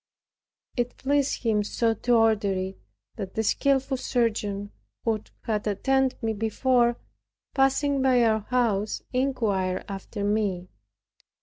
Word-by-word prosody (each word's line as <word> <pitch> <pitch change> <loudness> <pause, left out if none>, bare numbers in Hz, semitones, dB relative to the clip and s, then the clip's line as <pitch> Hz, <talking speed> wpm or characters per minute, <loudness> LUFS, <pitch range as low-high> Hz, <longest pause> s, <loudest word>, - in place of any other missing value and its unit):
It 245 -1 -2
pleased 280 0 0
Him 215 -3 +2
so 225 +2 +1
to 240 +3 +1
order 220 -3 +3
it, 190 0 -4 0.4
that 195 -3 -6
the 220 - +1
skillful 270 +4 +1
surgeon, 210 -5 -1 0.3
who 220 -2 +1 0.2
had 215 -2 -1
attended 265 +5 +1
me 225 0 +1
before, 240 +3 +2 0.6
passing 275 +1 +2
by 255 -2 +4
our 220 -1 +3
house, 215 -3 0
inquired 220 -8 0
after 200 +1 -6
me. 200 -4 0
225 Hz, 120 wpm, -26 LUFS, 205-255 Hz, 0.6 s, by